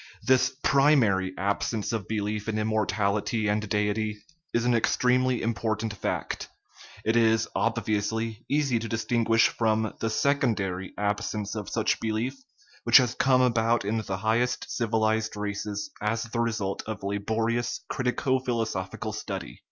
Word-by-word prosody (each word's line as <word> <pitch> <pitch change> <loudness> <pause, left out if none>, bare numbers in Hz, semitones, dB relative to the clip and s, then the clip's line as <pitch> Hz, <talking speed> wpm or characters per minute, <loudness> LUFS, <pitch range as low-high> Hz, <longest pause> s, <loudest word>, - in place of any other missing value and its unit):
This 130 0 +3
primary 130 -10 +4
absence 100 +3 -1
of 110 -5 -3
belief 105 0 -2
in 110 - -1
im 110 0 0
mortality 105 0 0
and 105 0 0
deity 105 +1 0 0.3
is 120 0 0
an 125 - +3
extremely 125 +2 +2
important 110 -1 -1
fact; 100 - -3 0.6
it 110 - +2
is, 115 -1 +3
obviously, 110 0 -1
easy 140 -5 +2
to 115 0 -5
distinguish 115 0 +2
from 110 -1 0
the 115 - -1
secondary 110 -8 0
absence 105 0 -2
of 105 -3 -5
such - - 0
belief, 110 +4 -1 0.5
which - - +8
has 125 -1 +3
come 130 0 +3
about 115 -2 +2
in 110 +3 0
the 95 -3 -3
highest 115 +5 0
civilized 110 -1 +1
races 105 0 -4
as 115 +2 0
the 115 +1 -4
result 110 -4 -1
of 110 -2 -5
laborious 110 +4 -1
critico 130 0 0
philosophical 110 -3 -2
study. 100 -3 -6
110 Hz, 135 wpm, -27 LUFS, 105-115 Hz, 0.6 s, which